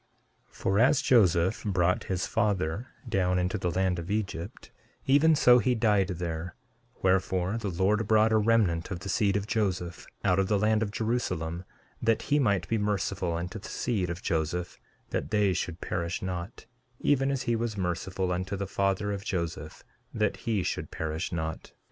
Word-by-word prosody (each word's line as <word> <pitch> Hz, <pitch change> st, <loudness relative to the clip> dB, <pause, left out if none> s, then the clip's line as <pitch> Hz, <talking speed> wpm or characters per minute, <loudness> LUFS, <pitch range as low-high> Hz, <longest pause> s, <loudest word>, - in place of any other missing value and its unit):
13:7 -, -, -24 dB
For 95 Hz, +2 st, 0 dB
as 125 Hz, +4 st, +4 dB
Joseph 95 Hz, -5 st, +3 dB
brought 90 Hz, -3 st, +1 dB
his 90 Hz, -1 st, -1 dB
father 105 Hz, -2 st, 0 dB, 0.2 s
down 90 Hz, -5 st, +1 dB
into 90 Hz, +3 st, 0 dB
the 90 Hz, -, -1 dB
land 90 Hz, 0 st, 0 dB
of 85 Hz, +2 st, -7 dB
Egypt, 100 Hz, -1 st, -4 dB, 0.3 s
even 150 Hz, +4 st, +5 dB
so 125 Hz, -4 st, +6 dB
he 125 Hz, 0 st, +1 dB
died 105 Hz, -4 st, +3 dB
there; 85 Hz, -1 st, -4 dB, 0.5 s
wherefore, 95 Hz, +2 st, +1 dB
the 105 Hz, -3 st, -3 dB
Lord 100 Hz, +4 st, +1 dB
brought 110 Hz, 0 st, +4 dB
a 110 Hz, -, +4 dB
remnant 105 Hz, -7 st, +2 dB
of 90 Hz, -3 st, -5 dB
the 100 Hz, -, -6 dB
seed 100 Hz, 0 st, +2 dB
of 100 Hz, -, -3 dB
Joseph 95 Hz, -6 st, -2 dB, 0.2 s
out 95 Hz, -1 st, +3 dB
of 95 Hz, -, +2 dB
the 105 Hz, -, +2 dB
land 110 Hz, +2 st, +2 dB
of 110 Hz, -, 0 dB
Jerusalem, 90 Hz, -7 st, -2 dB, 0.4 s
that 115 Hz, -1 st, +2 dB
he 145 Hz, -, +5 dB
might 100 Hz, -8 st, +1 dB
be 115 Hz, -, 0 dB
merciful 95 Hz, -3 st, -1 dB
unto 90 Hz, +5 st, -4 dB
the -, -, -9 dB
seed 100 Hz, -8 st, -1 dB
of 85 Hz, +1 st, -5 dB
Joseph 85 Hz, +1 st, -2 dB, 0.3 s
that -, -, -2 dB
they 105 Hz, -3 st, +2 dB
should 85 Hz, -1 st, -3 dB
perish 85 Hz, 0 st, -3 dB
not, 90 Hz, +3 st, -5 dB, 0.3 s
even 135 Hz, -1 st, +2 dB
as 135 Hz, -2 st, -1 dB
he 120 Hz, -, +1 dB
was 115 Hz, -2 st, -2 dB
merciful 90 Hz, +1 st, -2 dB
unto 95 Hz, +2 st, -2 dB
the 100 Hz, +1 st, -3 dB
father 100 Hz, +1 st, 0 dB
of 100 Hz, -1 st, -5 dB
Joseph 85 Hz, -4 st, -4 dB, 0.3 s
that -, -, +1 dB
he 110 Hz, -5 st, -1 dB
should -, -, -3 dB
perish 80 Hz, +2 st, -3 dB
not. 80 Hz, -2 st, -4 dB
95 Hz, 180 wpm, -28 LUFS, 90-110 Hz, 0.5 s, so